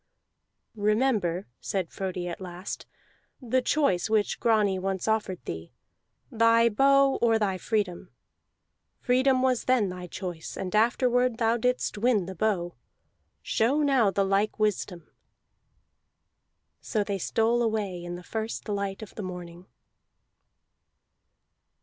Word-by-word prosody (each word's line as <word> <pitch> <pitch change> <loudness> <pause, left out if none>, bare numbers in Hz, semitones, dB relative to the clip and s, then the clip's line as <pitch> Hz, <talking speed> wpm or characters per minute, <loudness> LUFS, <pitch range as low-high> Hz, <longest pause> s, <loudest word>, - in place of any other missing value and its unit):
"Remember," 210 -4 +1
said 190 -4 -3
Frodi 185 -2 -4
at 175 +2 -6
last, 180 +1 -7 0.5
"the 255 0 0
choice 245 -11 +1
which 215 -2 +1
Grani 210 -5 +2
once 190 +1 -2
offered 210 - -1
thee: 80 +1 -7 0.6
the 230 0 +4
bow 275 +2 +4
or 230 -1 +4
thy 195 -4 -1
freedom. 205 -6 -2 0.9
Freedom 255 +1 +2
was 255 -2 +1
then 250 -6 +2
thy 180 0 -7
choice, 175 -2 -6
and 190 +2 -3
afterward 245 +2 +2
thou 230 -1 +2
didst 250 -2 -1
win 220 -4 +2
the 190 - -6
bow. 185 -3 -1 0.7
Show 270 +7 +1
now 265 -7 +4
the 195 +1 +1
like 200 +2 +1
wisdom." 205 -5 -1 1.7
So 215 -3 -1
they 200 -1 -3
stole 230 +5 +1
away 210 -6 -1
in 175 0 -5
the 180 - -9
first 220 +5 -4
light 200 0 -3
of 210 - -11
the - - -6
morning. 180 -1 -8
210 Hz, 125 wpm, -27 LUFS, 185-235 Hz, 1.7 s, the